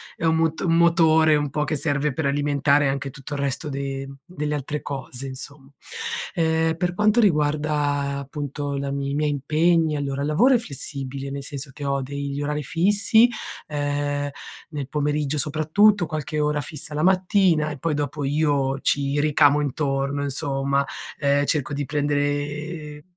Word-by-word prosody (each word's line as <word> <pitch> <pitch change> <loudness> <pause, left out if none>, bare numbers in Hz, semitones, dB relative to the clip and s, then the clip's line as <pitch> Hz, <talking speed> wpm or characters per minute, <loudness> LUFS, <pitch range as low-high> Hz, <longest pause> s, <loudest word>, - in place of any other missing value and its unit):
è - - -3
un 160 0 +3
moto 160 +2 0
un 165 - +3
motore 160 -2 +5
un 145 -1 0
po' 150 +2 -1
che 150 +1 -1
serve 145 0 0
per 160 +2 -2
alimentare 145 0 +2
anche 135 0 -2
tutto 135 +2 -9
il 145 - -3
resto 140 +2 -2
de 135 -1 -4 0.2
delle 150 -4 -4
altre 145 +1 -4
cose, 135 -1 -6
insomma. 135 +1 -9 0.6
Ehm, 160 0 +2
per 175 0 -1
quanto 210 +4 +3
riguarda, 150 -5 +1
appunto, 145 0 -4
la 140 0 -3
i 140 0 -2
miei 150 +1 +1
impegni, 155 +3 +2
allora, 140 -1 -2
il 145 - -1
lavoro 240 - +4
è - - +5
flessibile, 140 - -6
nel 140 0 -5
senso 140 0 -6
che 145 -1 -7
ho 140 0 0
degli 140 +1 -4
orari 150 +1 -2
fissi, 205 - +4 0.4
ehm, 145 -1 -1 0.4
nel 145 -4 -5
pomeriggio, 150 0 0
soprattutto, 160 +7 +3
qualche 155 -1 -3
ora 150 0 +1
fissa 150 +2 -6
la 150 - -1
mattina 185 -4 +3
e 145 - -6
poi 155 +3 -1
dopo 145 0 -2
io 140 -2 +1
ci 140 0 +1
ricamo 145 0 +4
intorno, 140 0 -1
insomma. 140 -1 0 0.3
Ehm, 145 0 +2
cerco 145 -1 -1
di 145 0 -2
prendere 145 +1 -2
145 Hz, 160 wpm, -23 LUFS, 140-155 Hz, 0.6 s, motore